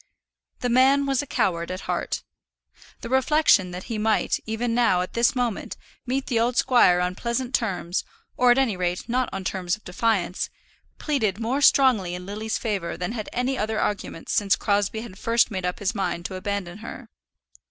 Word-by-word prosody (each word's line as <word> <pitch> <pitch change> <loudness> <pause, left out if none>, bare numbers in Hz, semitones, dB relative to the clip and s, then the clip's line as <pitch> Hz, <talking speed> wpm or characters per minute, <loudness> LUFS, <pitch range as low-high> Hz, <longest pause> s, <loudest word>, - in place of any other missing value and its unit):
The 245 - 0
man 265 +3 +4
was 275 -1 +1
a 290 - -8
coward 180 -10 0
at 185 +1 -4
heart. - - -3 0.8
The - - -5
reflection 265 -7 +4
that 180 +1 -7
he 225 -2 -4
might, 220 0 +1
even 230 +2 -1
now, 230 -7 +3
at 185 - -8
this 235 +3 +2
moment, 245 -5 -2 0.3
meet 260 +2 -1
the 235 - 0
old 240 +2 +1
squire 240 -9 +5
on 180 0 0
pleasant 240 +5 -3
terms, 185 -7 -1 0.3
or 250 - +4
at 245 - +6
any 260 -7 +2
rate 180 +1 -2
not 250 +1 0
on 195 0 -5
terms 185 -1 -1
of 215 - -21
defiance, 185 -1 -1 0.5
pleaded 220 -10 -1
more 245 +5 -1
strongly 240 -11 +4
in 180 0 -7
Lily's 215 +3 -3
favour 200 -8 -3
than 180 +2 -3
had 220 -3 -5
any 250 +2 -1
other 215 0 -1
argument 200 -5 -3
since 200 -2 +3
Crosbie 205 +1 0
had 210 -4 -10
first 230 0 +2
made 185 -2 -2
up 180 - -3
his 200 +1 -1
mind 180 -4 -2
to 190 - -4
abandon 195 -1 -4
her. 225 - -9
220 Hz, 185 wpm, -24 LUFS, 185-245 Hz, 0.8 s, at